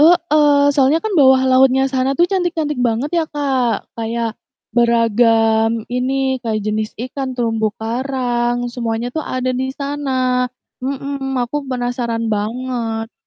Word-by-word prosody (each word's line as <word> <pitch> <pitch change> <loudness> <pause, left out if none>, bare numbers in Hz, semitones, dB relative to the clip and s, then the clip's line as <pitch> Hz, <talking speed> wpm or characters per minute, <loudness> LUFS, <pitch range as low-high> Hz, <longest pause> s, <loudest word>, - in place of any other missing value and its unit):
heeh, 300 -3 +5
soalnya 280 +6 +2
kan 435 - -1
bawah 265 -5 +5
lautnya 265 0 +4
sana 265 +1 0
tuh 345 - +5
cantik-cantik 340 -7 -1
banget 245 +4 0
ya, - - 0
Kak, 265 -6 -1
kayak 230 0 -3 0.4
beragam 230 -1 +3
ini, 265 +1 0
kayak 220 -3 -2
jenis 215 0 -2
ikan, 260 +1 -5
terumbu 225 -2 0
karang, 240 0 -1
semuanya 235 0 -3
tuh 315 - -3
ada 255 0 -1
di 260 +1 -2
sana, 260 -3 -1 0.3
mhm, 270 0 -3
aku 280 +2 -4
penasaran 245 -3 -2
banget. 225 +1 -3
255 Hz, 125 wpm, -18 LUFS, 230-275 Hz, 0.4 s, heeh